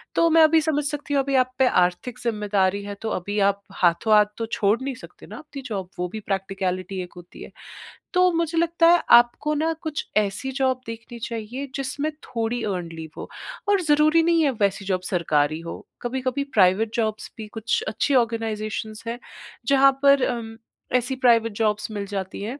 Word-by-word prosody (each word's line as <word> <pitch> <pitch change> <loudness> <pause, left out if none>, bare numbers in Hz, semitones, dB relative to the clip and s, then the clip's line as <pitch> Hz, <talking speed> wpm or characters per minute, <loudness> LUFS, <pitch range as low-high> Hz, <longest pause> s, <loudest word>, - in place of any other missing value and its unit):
तो 335 - +4
मैं 325 0 +5
अभी 315 +1 +5
समझ 300 -1 0
सकती 290 0 -4
हूँ 280 - +3
अभी 275 0 -1
आप 255 -1 +3
पे 265 - +5
आर्थिक 180 +6 +1
जिम्मेदारी 205 -4 0
है 205 0 -6
तो 225 - -3
अभी 205 +4 -3
आप 200 0 -3 0.2
हाथों-हाथ 210 +5 +4
तो 230 - -2
छोड़ 210 +1 +2
नहीं 270 +1 -3
सकते 170 -6 -13
ना 215 - -9
आपकी 290 -1 -9
जॉब, 195 -6 -4
वो 180 - -1
भी 220 - -4
प्रक्टिकैलिटी 195 -2 -3
एक 180 - -12
होती 175 0 -12
है। - - -11 0.6
तो 365 0 +4
मुझे 335 0 -1
लगता 335 0 +3
है 350 - +5 0.2
आपको 240 +5 -1
ना 320 +2 0
कुछ 310 -3 -4
ऐसी 210 +5 0
जॉब 260 -1 +1
देखनी 230 +1 -8
चाहिए 230 +4 -5
जिसमें 280 +3 -2
थोड़ी 230 0 -3
अर्न्ड 180 -5 -3
लीव 160 -1 -8
हो - - -7 0.4
और 400 -2 +3
ज़रूरी 310 +1 +4
नहीं 335 -1 +3
है 285 - +3
वैसी 200 0 +1
जॉब 185 -1 -1
सरकारी 155 -4 +1
हो। 170 0 -8 0.2
कभी-कभी 255 +2 -2
प्राइवेट 205 +2 +3
जॉब्स 215 -2 -2
भी 220 -1 -7
कुछ 225 +2 0
अच्छी 225 +6 0
आर्गेनाइजेशंस 220 -1 -4
हैं 235 +1 -4 0.5
जहाँ 275 0 +6
पर 280 -1 +5
उम, 225 -1 -8 0.4
ऐसी 250 +2 -2
प्राइवेट 230 -3 +3
जॉब्स 210 0 0
मिल 205 -2 -4
जाती 195 -2 -5
हैं, 245 +7 -5
230 Hz, 185 wpm, -23 LUFS, 200-275 Hz, 0.6 s, जहाँ